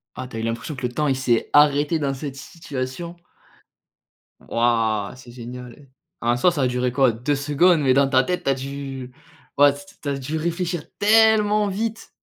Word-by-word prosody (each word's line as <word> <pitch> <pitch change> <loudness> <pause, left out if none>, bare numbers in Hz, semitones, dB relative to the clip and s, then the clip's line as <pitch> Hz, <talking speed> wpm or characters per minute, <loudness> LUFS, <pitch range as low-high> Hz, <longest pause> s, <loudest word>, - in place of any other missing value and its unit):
Ah! 130 - -6
Tu 125 - -10
as 110 - -3
eu - - -4
l'impression 115 +6 -3
que 130 -2 -3
le 120 - -6
temps 150 +4 -1
il 135 - +1
s'est 120 -3 0
arrêté 145 +2 +4
dans 140 -3 -1
cette 135 0 -6
situation. 145 +2 -6 1.2
Waouh, 115 -2 0
c'est 125 -2 -14
génial! 125 +3 -10 0.3
En 120 +1 +1
soi, 175 +9 +3
ça 145 -5 -2
a - - +3
duré 125 0 -1
quoi? 135 -1 +4
2 125 +6 -1
secondes, 150 +5 +3
mais 135 -3 +3
dans 140 0 +4
ta 130 -1 +4
tête 180 +5 -3
tu - - +2
as - - +3
dû 135 -1 -7 0.4
ouais 145 0 +6
c 145 0 -11
t - - -17
tu 145 - -4
as 140 -1 -1
dû 145 +4 -4
réfléchir 170 0 -2 0.2
tellement 215 -1 +4
vite! 225 +3 -4
140 Hz, 200 wpm, -22 LUFS, 125-160 Hz, 1.2 s, ouais